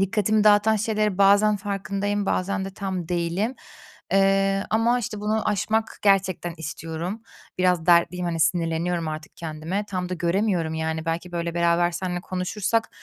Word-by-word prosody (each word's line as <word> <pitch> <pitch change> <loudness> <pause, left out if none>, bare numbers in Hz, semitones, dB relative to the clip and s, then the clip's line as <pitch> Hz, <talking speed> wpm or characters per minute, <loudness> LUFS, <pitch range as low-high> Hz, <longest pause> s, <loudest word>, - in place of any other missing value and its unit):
dikkatimi 210 +2 +2
dağıtan 210 +1 +5
şeylerin 210 -2 0
bazen 200 +2 +5
farkındayım, 200 0 -2
bazen 190 +1 -1
de 195 - -5
tam 190 -4 -4
değilim. 180 +7 -1 0.6
Eee, 195 0 +3
ama, 230 +3 +2
işte, 215 -3 -5
bunu 215 +1 0
aşmak 220 +2 -1
gerçekten 190 -4 +2
istiyorum. 165 +6 -5 0.4
Biraz 180 -3 +2
dertliyim, 175 +1 +3
hani, 165 -1 -2
sinirleniyorum 165 +1 0
artık 155 0 -7
kendime. 165 +5 -4
Tam 180 -2 -3
da 180 - -2
göremiyorum 175 -1 0
yani. 160 0 -2
Belki, 165 +2 -3
böyle, 170 -1 -3
beraber 170 0 +2
seninle 180 0 -3
konuşursak, 195 +5 -1
185 Hz, 145 wpm, -24 LUFS, 170-205 Hz, 0.6 s, dağıtan